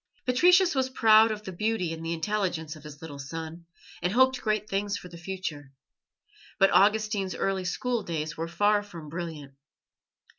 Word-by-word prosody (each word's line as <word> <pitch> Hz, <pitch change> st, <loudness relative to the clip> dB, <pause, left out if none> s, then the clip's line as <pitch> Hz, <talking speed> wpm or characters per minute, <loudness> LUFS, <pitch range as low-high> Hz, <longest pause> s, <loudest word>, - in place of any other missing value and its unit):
Patricius 355 Hz, +8 st, +5 dB
was 260 Hz, -1 st, 0 dB
proud 220 Hz, -3 st, +6 dB
of 215 Hz, -1 st, -4 dB
the 190 Hz, -, -6 dB
beauty 185 Hz, -2 st, -1 dB
and 165 Hz, 0 st, -7 dB
the 165 Hz, -, -3 dB
intelligence 170 Hz, -3 st, -2 dB
of 155 Hz, -, -14 dB
his 150 Hz, 0 st, -11 dB
little 145 Hz, -3 st, -8 dB
son, 165 Hz, +4 st, -7 dB, 0.3 s
and 180 Hz, +1 st, 0 dB
hoped 260 Hz, +1 st, +3 dB
great 215 Hz, -1 st, -1 dB
things 200 Hz, 0 st, -1 dB
for 180 Hz, -, -10 dB
the 175 Hz, -, -12 dB
future; 165 Hz, -7 st, -6 dB, 0.8 s
but 195 Hz, -1 st, +5 dB
Augustine's 205 Hz, 0 st, +2 dB
early 190 Hz, -1 st, -1 dB
school 240 Hz, +6 st, -1 dB
days 155 Hz, -4 st, -4 dB
were 165 Hz, +1 st, -4 dB
far 205 Hz, +4 st, +2 dB
from 170 Hz, -7 st, -10 dB
brilliant. 160 Hz, -4 st, -6 dB
190 Hz, 170 wpm, -27 LUFS, 165-215 Hz, 0.8 s, proud